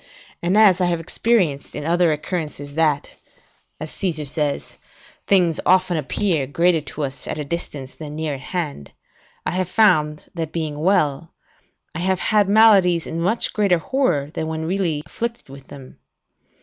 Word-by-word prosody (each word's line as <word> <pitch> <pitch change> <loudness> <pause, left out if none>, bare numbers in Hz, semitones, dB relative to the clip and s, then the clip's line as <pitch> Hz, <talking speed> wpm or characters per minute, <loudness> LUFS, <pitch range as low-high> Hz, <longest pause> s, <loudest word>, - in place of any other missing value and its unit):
And, 180 +4 +1
as 195 -4 +6
I 180 - +3
have 170 -1 0
experienced 165 -4 0
in 145 - -5
other 170 0 +3
occurrences, 150 -2 -4
that, 150 -2 0 0.6
as 155 - -6
Caesar 160 -6 -2
says, 145 0 -2 0.5
things 175 -5 +3
often 185 -1 +3
appear 155 0 0
greater 170 +3 +2
to 150 +1 -6
us 135 0 -4
at - - -3
distance 145 -6 -5
than 150 -2 -8
near 155 -1 -2
at 135 - -6
hand, 145 - -5 0.5
I - - -1
have 185 +1 -2
found, 155 -8 +2
that 165 -2 -4
being 155 -3 -3
well, 155 -3 +1 0.6
I 155 - -5
have 185 +1 +1
had 205 -1 +2
maladies 200 -6 +5
in 165 +1 -4
much 200 +7 +1
greater 200 -5 +2
horror 165 - 0
than 160 - -3
when 160 0 -3
really 170 -4 -1
afflicted 235 - -5
with 135 0 -12
them. 135 -2 -13
165 Hz, 160 wpm, -21 LUFS, 150-185 Hz, 0.6 s, as